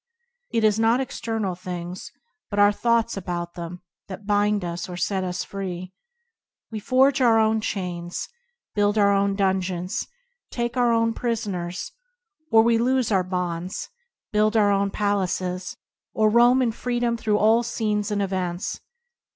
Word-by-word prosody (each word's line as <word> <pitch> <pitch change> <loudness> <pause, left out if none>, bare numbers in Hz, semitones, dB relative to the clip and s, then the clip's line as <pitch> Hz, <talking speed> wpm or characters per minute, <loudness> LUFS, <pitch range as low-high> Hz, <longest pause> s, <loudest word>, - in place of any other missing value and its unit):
It 230 - 0
is 215 0 +3
not 225 +2 +3
external 225 -6 -2
things, 180 0 -7 0.4
but 205 - -4
our 205 0 +6
thoughts 235 +2 +1
about 175 -2 -4
them, 175 +1 -7 0.2
that 200 +1 -8
bind 205 -1 +1
us 170 +1 -4
or 175 - -6
set 190 +1 -1
us 180 -1 -3
free. 185 -2 -6 0.8
We 220 - -4
forge 265 +4 +3
our 230 -3 +5
own 220 0 +3
chains, 175 -4 -4 0.5
build 205 0 +2
our 200 -1 +4
own 200 0 +2
dungeons, 190 -2 -1 0.4
take 235 0 -3
ourselves 230 -2 +2
prisoners; 200 - -3 0.6
or 225 0 +7
we 230 0 +3
loose 255 -1 +1
our 190 -2 +3
bonds, 180 +1 -3 0.4
build 215 +1 +2
our 205 -2 +4
own 200 0 +2
palaces, 185 -3 -1 0.4
or 215 -1 +3
roam 240 +3 +5
in 235 - +1
freedom 240 0 -1
through 215 -2 0
all 220 +2 +4
scenes 215 -3 -1
and 205 -1 0
events. 185 -2 -3
205 Hz, 145 wpm, -24 LUFS, 185-225 Hz, 0.8 s, or